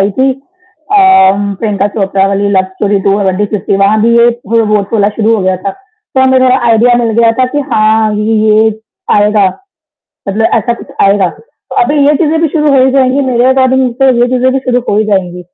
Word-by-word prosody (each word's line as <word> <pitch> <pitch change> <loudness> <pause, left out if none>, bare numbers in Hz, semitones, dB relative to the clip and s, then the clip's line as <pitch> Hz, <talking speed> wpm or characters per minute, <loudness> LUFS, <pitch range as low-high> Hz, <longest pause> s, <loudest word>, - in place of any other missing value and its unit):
आई 195 +1 +1
थी 265 +1 +2
अ, 365 +6 -8 0.6
प्रियंका 205 -3 -1
चोपड़ा 195 -1 0
वाली 200 +1 -1
love 190 - +2
story 200 -1 -1
two 200 +1 +1 0.3
fifty 195 0 -2
वहाँ 200 +2 +1
भी 235 +1 +2
ये 235 0 +4 0.3
रोबोट 210 -2 0
वाला 205 -1 +2
शुरू 225 0 +1
हो 205 - -3
गया 185 0 0
था। 195 - -1
तो 400 - -7
हमें 260 0 +3
थोड़ा 255 0 +3
आईडिया 235 +2 +3
मिल 235 -1 -1
गया 230 -1 +3
था 255 - +3
कि 290 - 0
हाँ, 215 0 +1
ये 210 +1 -2
ये 215 +1 +3 0.5
आएगा, 210 -1 +2 0.8
मतलब 220 +3 -1
ऐसा 235 +2 -2
कुछ - - -12 0.2
आएगा। 195 -1 +2
तो 480 - -15
अभी 290 +4 -1
ये 295 - +3
चीज़ें 320 +1 0
भी 330 - +2
शुरू 300 -1 0
हो 260 - +4
ही 265 - +1
जाएगी 265 +1 +1
मेरे 240 0 +1
अकॉर्डिंग 260 -1 +1
तो 270 - +4
ये 245 - +2
चीज़ें 255 +1 +1
भी 270 - 0
शुरू 245 0 +1
हो 205 - 0
ही 215 - 0
जाएँगी। 180 -2 -3
225 Hz, 210 wpm, -10 LUFS, 205-260 Hz, 0.8 s, ये